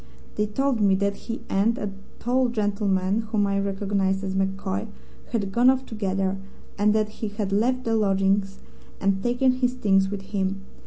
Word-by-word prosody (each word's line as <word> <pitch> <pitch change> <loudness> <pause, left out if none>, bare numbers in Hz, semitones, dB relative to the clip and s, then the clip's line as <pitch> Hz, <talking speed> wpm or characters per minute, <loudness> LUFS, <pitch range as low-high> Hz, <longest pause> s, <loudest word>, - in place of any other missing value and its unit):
They 210 - 0
told 255 +2 0
me 195 -2 +4
that 200 +1 0
he 230 +3 -6
and 210 +4 +2
a 205 -1 -3 0.3
tall 250 +1 +1
gentleman 200 -3 0
(whom 210 -3 +2
I 200 0 +1
recognized 195 -1 0
as 190 -1 -2
MacCoy) 195 +2 -1 0.4
had 205 -5 -1
gone 240 +5 +5
off 260 0 +2
together, 195 -3 -1 0.4
and 210 +1 +3
that 215 -1 +1
he 220 +1 -5
had 205 -1 -3
left 250 +5 +1
the 230 -1 +1
lodgings 195 -1 +1 0.4
and 195 -1 +1
taken 245 +3 +2
his 255 0 0
things 195 -5 +3
with 200 -1 -5
him. 195 0 -1
205 Hz, 170 wpm, -25 LUFS, 195-225 Hz, 0.4 s, gone